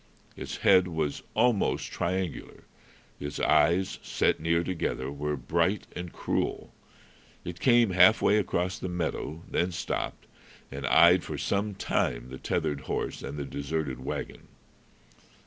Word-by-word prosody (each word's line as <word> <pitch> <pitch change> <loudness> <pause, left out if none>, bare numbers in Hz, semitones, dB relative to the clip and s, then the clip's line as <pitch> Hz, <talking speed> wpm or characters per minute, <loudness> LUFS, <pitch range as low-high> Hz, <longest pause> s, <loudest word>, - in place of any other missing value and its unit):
Its - - -6
head 90 -1 +6
was 80 -4 -2
almost 120 -5 +1
triangular; 90 -1 -3 0.6
its 70 0 -5
eyes, 90 +3 +3
set - - +1
near 85 +1 +1
together, 75 -7 -2
were 75 +1 -2
bright 85 +7 0
and 90 -1 -5
cruel. - - -2 0.7
It 85 0 -6
came 120 -5 +4
half 95 +4 +6
way 105 - +3
across 90 -1 -1
the 95 - -4
meadow, 85 -2 -3
then 90 +1 0
stopped, - - -4 0.5
and 70 0 -4
eyed 85 +4 +6
for - - -5
some 100 +1 -1
time - - -1
the 65 - -8
tethered 70 -2 -1
horse - - -2
and 70 +2 -6
the 70 - -3
deserted 70 -2 -3
wagon. - - -5
85 Hz, 135 wpm, -28 LUFS, 75-95 Hz, 0.7 s, head